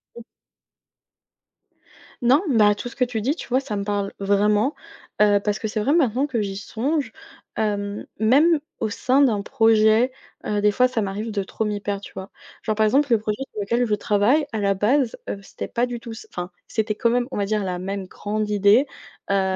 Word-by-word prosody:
Mmh. 235 - -9 2.0
Non, 260 +6 +5
bah, 215 -5 +5
tout 205 +4 -6
ce - - -14
que 260 - +1
tu 240 -3 -2
dis, 270 +8 0
tu - - -8
vois, 255 +1 +2
ça 265 -6 -5
me 200 - -2
parle 200 -1 -2
vraiment, 205 +6 +2 0.5
heu, 205 -1 +5
parce 205 +1 -2
que 220 - -3
c'est 215 0 -3
vrai 270 +8 +1
maintenant 265 -5 +2
que 250 -6 -2
j'y 195 -1 -3
songe, 260 +5 -2 0.5
hem, 205 -1 -2
même 290 +9 +4 0.2
au 220 - -1
sein 255 +6 +2
d'un 220 -7 +2
projet, 225 +2 +4 0.3
heu, 210 - -1
des 210 0 +3
fois 250 +5 +3
ça 230 -4 -1
m'arrive 200 +3 -4
de 205 -2 -2
trop 220 - -4
m'y 210 -1 -2
perdre, 200 -1 -3
tu - - -11
vois? 190 +1 -8 0.3
Genre, 220 - 0
par 220 0 +3
exemple, 275 +3 +2
le 230 - +5
projet 215 +4 -3
sur 210 - -5
lequel 235 +5 +1
je 215 - -1
travaille 210 +9 +2
à 225 - -3
la 200 -1 +2
base, 230 +6 +1
heu, 200 - -4
c'était - - -7
pas 240 +1 0
du 245 -1 -5
tout 230 0 -8
s 225 - -10
enfin, 175 0 -5 0.2
c'était 215 -1 -1
quand 235 +2 +1
même, 245 0 +1
on 265 - -5
va 200 - 0
dire, 210 0 -1
la 180 -2 -2
même 190 +1 -4
grande 210 +2 -3
idée, 210 +6 +4 0.4
heu, 190 -1 +1
215 Hz, 215 wpm, -23 LUFS, 205-245 Hz, 2.0 s, Non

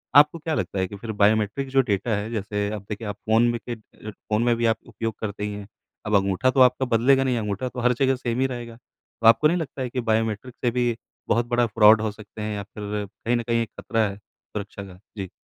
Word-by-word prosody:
आपको 150 +3 +6
क्या 160 0 -3
लगता 95 - -2
है 95 - 0
कि 100 - -9
फ़िर 110 +2 -6
बायोमेट्रिक 110 +5 +2
जो 135 0 +4
डेटा 100 +2 0
है 105 +2 -3
जैसे 105 -2 -2
अब 105 - -4
देखिए 105 +1 -5
आप 105 - -4
फ़ोन 110 +1 +5
में 120 - -3
के - - -1
अ 110 -1 -17
अ, - - -3
फ़ोन 105 +2 -2
में 120 -1 +3
भी 115 0 -1
आप 115 -1 +3
उपयोग 115 -2 -4
करते 105 -1 -4
ही 105 - -3
हैं। 100 -1 -8 0.4
अब 105 0 +1
अंगूठा 100 +6 +2
तो 135 - 0
आपका 125 +1 -3
बदलेगा 135 +3 +4
नहीं। 130 -2 +1
अंगूठा 105 +3 -2
तो 125 - -7
हर 125 +1 +3
जगह 135 -1 +3
सेम 125 -1 -3
ही 135 - +3
रहेगा। 120 -1 -7
तो 115 -1 -5
आपको 115 +7 +7
नहीं 170 +3 +1
लगता 145 -5 -5
है 125 - -2
कि 125 +1 -2
बायोमेट्रिक 110 +2 -1
से 120 - +3
भी 120 -1 +1 0.3
बहुत 120 0 +2
बड़ा 120 0 +3
फ़्रॉड 110 0 +6
हो 110 -1 -1
सकते 105 0 -11
हैं 105 0 -3
या 100 - -4
फिर 105 +1 -5
कहीं 115 +4 -2
न 120 - 0
कहीं 115 0 +1
एक 115 - -9
ख़तरा 115 -2 +1
है 100 - -8
सुरक्षा 100 0 -9
का? 95 -2 -12 0.2
जी। 95 -2 -4
110 Hz, 255 wpm, -24 LUFS, 105-120 Hz, 0.4 s, आपको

